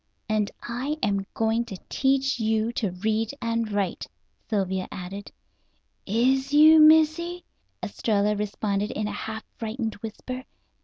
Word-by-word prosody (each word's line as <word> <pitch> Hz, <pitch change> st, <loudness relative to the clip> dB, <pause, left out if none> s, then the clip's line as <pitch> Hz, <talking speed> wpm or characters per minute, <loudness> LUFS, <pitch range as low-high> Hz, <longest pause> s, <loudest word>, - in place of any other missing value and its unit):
"And 215 Hz, -2 st, +1 dB
I 260 Hz, +6 st, -3 dB
am 200 Hz, -2 st, 0 dB
going 225 Hz, +1 st, +1 dB
to 195 Hz, -, -7 dB
teach 270 Hz, -1 st, +1 dB
you 220 Hz, 0 st, +1 dB
to 215 Hz, -4 st, -1 dB
read 220 Hz, +6 st, -1 dB
and 230 Hz, -2 st, -1 dB
write," 200 Hz, -3 st, -2 dB, 0.4 s
Sylvia 190 Hz, -3 st, -1 dB
added. 190 Hz, +3 st, -7 dB, 0.8 s
"Is 260 Hz, +6 st, +2 dB
you, 310 Hz, +2 st, +8 dB
Missy?" 320 Hz, +3 st, +4 dB, 0.4 s
Estralla 210 Hz, -1 st, 0 dB
responded 205 Hz, 0 st, -1 dB
in 215 Hz, 0 st, -2 dB
a -, -, -3 dB
half 220 Hz, +1 st, -5 dB
frightened 225 Hz, 0 st, -3 dB
whisper. 255 Hz, +4 st, -6 dB
220 Hz, 125 wpm, -26 LUFS, 205-265 Hz, 0.8 s, you